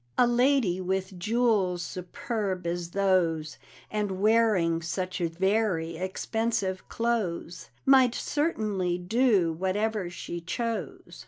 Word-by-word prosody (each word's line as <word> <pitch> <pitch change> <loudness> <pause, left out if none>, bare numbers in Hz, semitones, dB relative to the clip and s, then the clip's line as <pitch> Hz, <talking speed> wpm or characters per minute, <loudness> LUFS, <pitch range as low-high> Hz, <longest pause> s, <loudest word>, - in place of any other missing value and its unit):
A 250 - +6
lady 240 -6 +2
with 190 0 -2
jewels 210 -4 +1
superb 185 +2 -4
as 170 0 -2
those, 170 -6 +1 0.3
And 205 -3 -2
wearing 205 -6 +3
such 185 +3 -3
very 180 0 0
expensive 190 +2 -2
clothes, 210 -7 -2 0.2
Might 260 -3 +5
certainly 210 - -1
do 195 -2 +2
whatever 190 +2 -1
she 175 0 -6
chose! 230 +6 -4
190 Hz, 100 wpm, -28 LUFS, 175-225 Hz, 0.3 s, A